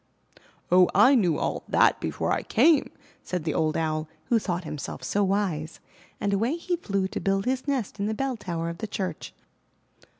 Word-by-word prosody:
'*0h, 180 0 +6
I 265 - +7
knew 180 - +3
all - - -2
that - - +4
before - - -2
I - - +1
came," 315 -4 +3 0.3
said 180 -3 -4
the 155 -2 -1
old 155 -1 +1
Owl, 155 -1 -1 0.2
who 235 - +4
thought 180 -3 -3
himself 145 -4 -6
so 200 +10 +1
wise, 185 -6 -1 0.4
and 200 - 0
away 230 +9 +1
he 350 +1 -2
flew 200 - -1
to - - -4
build 195 0 0
his 255 +2 -1
nest 255 -7 -2
in 200 - 0
the 220 - -1
bell 270 +1 -1
tower 170 -6 -4
of 170 - -7
the 220 - -4
church. 185 -6 -4
195 Hz, 190 wpm, -26 LUFS, 165-230 Hz, 0.4 s, I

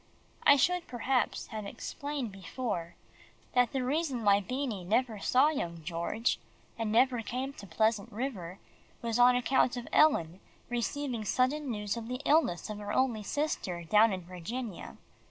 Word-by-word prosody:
I 285 - +9
should, 355 +6 +1
perhaps, 250 +1 0
have 215 -2 -5
explained 285 +1 -5
before, 195 -2 -4 0.6
that 245 -1 +3
the 265 -2 -1
reason 270 -2 -1
why 200 -1 +5
Beanie 250 -3 -3
never 220 +3 0
saw 260 +8 +4
young 170 - -4
George, 170 +8 -1 0.4
and 225 -2 -2
never 245 +1 +3
came 255 +5 -4
to 200 - -11
Pleasant 220 +5 +1
River, 200 -7 -4 0.5
was 230 0 -1
on 245 +1 +7
account 250 0 +2
of 240 - -6
Ellen 185 - +4 0.3
receiving 245 0 -2
sudden 260 +6 +1
news 210 -2 -2
of 230 -1 -6
the 250 +1 -4
illness 290 - +3
of 210 -1 -6
her 205 0 -5
only 240 -2 +1
sister 205 - -2
down 210 +6 +5
in 185 -1 -3
Virginia. 185 +5 -6
235 Hz, 155 wpm, -31 LUFS, 200-260 Hz, 0.6 s, I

